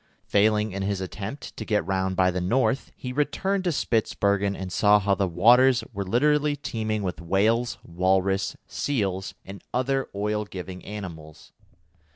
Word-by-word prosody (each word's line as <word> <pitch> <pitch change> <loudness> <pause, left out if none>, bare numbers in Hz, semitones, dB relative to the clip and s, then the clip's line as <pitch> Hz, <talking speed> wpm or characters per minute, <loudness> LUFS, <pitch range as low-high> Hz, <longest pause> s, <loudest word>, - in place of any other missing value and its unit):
Failing 105 +1 +2
in 100 +1 -4
his 100 0 -1
attempt 100 +7 -6
to - - -4
get 105 -5 0
round 95 0 -1
by 90 0 +3
the 90 0 -2
north, 130 +8 +1
he 125 -1 -6
returned 190 +7 0
to 175 - +2
Spitzbergen 100 -6 +1
and 95 -1 -6
saw 105 0 +5
how 100 -1 +1
the 100 0 +1
waters 120 +8 +5
were 100 - -3
literally 150 +8 +2
teeming 110 -6 -3
with 90 -4 -4
whales, 110 +7 +1
walrus, 95 +3 0
seals, 100 -9 -2
and 100 +1 -10
other 135 +1 0
oil 105 +1 -1
giving 95 -2 -8
animals. 85 -7 -9
100 Hz, 155 wpm, -25 LUFS, 95-120 Hz, -, saw